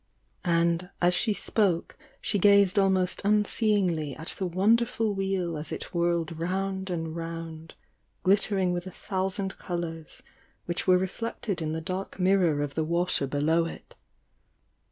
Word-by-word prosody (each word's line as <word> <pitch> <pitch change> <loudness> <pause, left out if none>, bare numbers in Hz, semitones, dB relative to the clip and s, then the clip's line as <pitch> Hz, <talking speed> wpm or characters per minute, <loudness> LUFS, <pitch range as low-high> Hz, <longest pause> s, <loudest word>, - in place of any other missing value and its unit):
And, 170 +1 +2
as 175 0 +3
she 215 +5 +2
spoke, 200 -4 0 0.2
she 205 - -1
gazed 200 0 +5
almost 190 -2 +2
unseeingly 200 - +1
at 160 - -3
the 190 - 0
wonderful 220 +4 +2
Wheel 190 -4 -1
as 150 - -6
it - - -6
whirled 170 -2 0
round 190 +2 -2
and 165 -2 -3
round, 165 -1 -6 0.5
glittering 195 -1 +2
with 175 +1 -3
a - - -4
thousand 190 +1 -3
colours 170 +5 -5 0.4
which 175 +2 -3
were 185 -1 +6
re 185 - +1
flected 205 -3 -4
in 155 -1 -2
the 160 - -3
dark 185 +4 -4
mirror 180 -6 +3
of 145 -1 -4
the 160 - 0
water 170 -3 +1
below 155 +4 +2
it. 165 - -9
180 Hz, 145 wpm, -27 LUFS, 165-195 Hz, 0.5 s, were